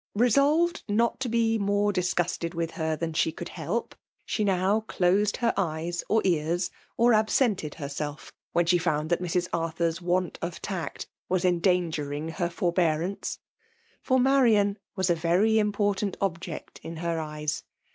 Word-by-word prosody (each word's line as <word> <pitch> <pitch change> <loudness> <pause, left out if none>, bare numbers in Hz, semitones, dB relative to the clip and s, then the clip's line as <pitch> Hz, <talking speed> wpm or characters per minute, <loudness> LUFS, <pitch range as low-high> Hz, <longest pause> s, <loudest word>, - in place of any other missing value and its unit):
Besolved 285 +9 +3
mot 230 +3 +1
to 260 -2 -2
be 225 -1 +2
more 205 0 +1
disgusted 175 -2 -1
with 165 -1 -2
her 160 -1 -1
than 165 0 -3
she 160 - +2
QOuld - - -7
helpi 180 +8 -3 0.3
she 215 - -1
now 195 +1 +2
closed 195 +3 +2
her 235 -2 +1
eyes 170 -2 -2
or 220 0 +3
ears> 170 0 +1 0.3
or 235 +1 +5
ailwt'pied 215 - +2
hcrs^^ 145 0 -5 0.2
when 175 - +2
she 175 +1 +3
found 155 -1 -1
that 175 - +2
Mrs. 175 0 0
r 170 - +1
Arthur's 165 +1 -1
want 180 0 0
of 170 0 -4
tact 190 -5 -4 0.2
was 185 0 +1
endangering 165 -4 +1
her 175 +1 -2
for*, 175 0 -1
liearaiice.; 170 +2 0 0.6
for 260 -1 +2
Marian 230 -6 +4 0.2
.was 190 -2 +1
a - - +3
very 180 +7 +3
important 205 -1 0
t>bject 175 -3 -4
in 165 - -7
her 165 0 -1
eyes. 150 -1 -3
180 Hz, 155 wpm, -27 LUFS, 165-205 Hz, 0.6 s, or